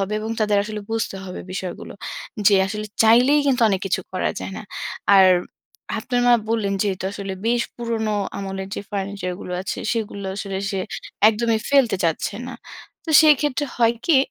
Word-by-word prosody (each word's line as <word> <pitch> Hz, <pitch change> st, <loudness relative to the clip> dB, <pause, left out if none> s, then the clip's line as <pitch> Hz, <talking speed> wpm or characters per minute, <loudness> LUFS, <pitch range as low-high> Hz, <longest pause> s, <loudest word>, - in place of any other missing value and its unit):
হবে 195 Hz, +2 st, -2 dB
এবং 220 Hz, +1 st, -4 dB
তাদের 210 Hz, -1 st, +2 dB
আসলে 210 Hz, 0 st, -5 dB
বুঝতে 225 Hz, -3 st, -2 dB
হবে 180 Hz, -, -7 dB
বিষয়গুলো। 185 Hz, -1 st, -6 dB, 0.5 s
যে 205 Hz, -, +7 dB
আসলে 210 Hz, +1 st, -4 dB, 0.2 s
চাইলেই 250 Hz, +7 st, +5 dB
কিন্তু 255 Hz, -3 st, +2 dB
অনেক 195 Hz, -2 st, 0 dB
কিছু 190 Hz, -, 0 dB
করা 185 Hz, -, 0 dB
যায় 190 Hz, -, -5 dB
না। -, -, -7 dB, 0.5 s
আর 190 Hz, -1 st, +8 dB, 0.7 s
আপনার 245 Hz, -1 st, -1 dB
মা 240 Hz, -, +7 dB, 0.2 s
বললেন 205 Hz, -3 st, 0 dB
যেহেতু 190 Hz, -2 st, -2 dB
আসলে 195 Hz, -1 st, -5 dB
বেশ 235 Hz, 0 st, +2 dB
পুরনো 225 Hz, -3 st, -1 dB, 0.2 s
আমলের 195 Hz, -1 st, -5 dB
যে -, -, -4 dB
ফার্নিচার 200 Hz, -2 st, -3 dB
গুলো 180 Hz, -, -6 dB
আছে 190 Hz, -, -4 dB
সেগুলো 205 Hz, -3 st, -3 dB
আসলে 195 Hz, -2 st, -4 dB
সে 195 Hz, -, -2 dB, 0.5 s
একদমই 225 Hz, 0 st, +1 dB
ফেলতে 270 Hz, -8 st, +4 dB
চাচ্ছে 165 Hz, +4 st, 0 dB
না। 260 Hz, -, -7 dB, 0.5 s
তো 325 Hz, -, -4 dB
সেই 305 Hz, -1 st, +7 dB
ক্ষেত্রে 295 Hz, -1 st, 0 dB
হয় 235 Hz, -1 st, +3 dB
কি 325 Hz, -5 st, +5 dB
210 Hz, 170 wpm, -22 LUFS, 195-235 Hz, 0.7 s, আর